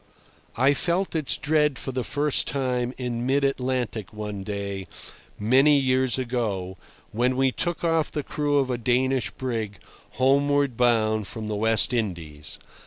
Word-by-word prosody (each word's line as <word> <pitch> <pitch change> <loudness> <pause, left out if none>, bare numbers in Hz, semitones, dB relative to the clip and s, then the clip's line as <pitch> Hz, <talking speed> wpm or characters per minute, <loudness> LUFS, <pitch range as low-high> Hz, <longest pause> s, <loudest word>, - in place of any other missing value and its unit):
I 135 +2 +4
felt 175 +6 -1
its 155 -4 +2
dread 150 -2 +1
for 130 - -4
the 130 -1 -2
first 145 +2 0
time 125 -3 -1
in 120 -2 -3
mid 140 +2 +2
Atlantic 125 -6 -1
one 105 -1 -5
day, 100 -1 -5 0.5
many 135 +7 +4
years 130 -1 +1
ago, 110 -8 -2 0.4
when 125 +3 +1
we 135 0 +3
took 175 +6 -2
off 165 -2 +1
the 150 - -4
crew 145 0 0
of 135 -2 +1
a 120 - -2
Danish 125 +2 +1
brig 115 -6 -4 0.4
homeward 140 0 +2
bound 110 -3 +2
from 110 0 -6
the 105 - -2
West 110 +3 +2
Indies. 85 -10 -4
125 Hz, 150 wpm, -25 LUFS, 110-140 Hz, 0.5 s, I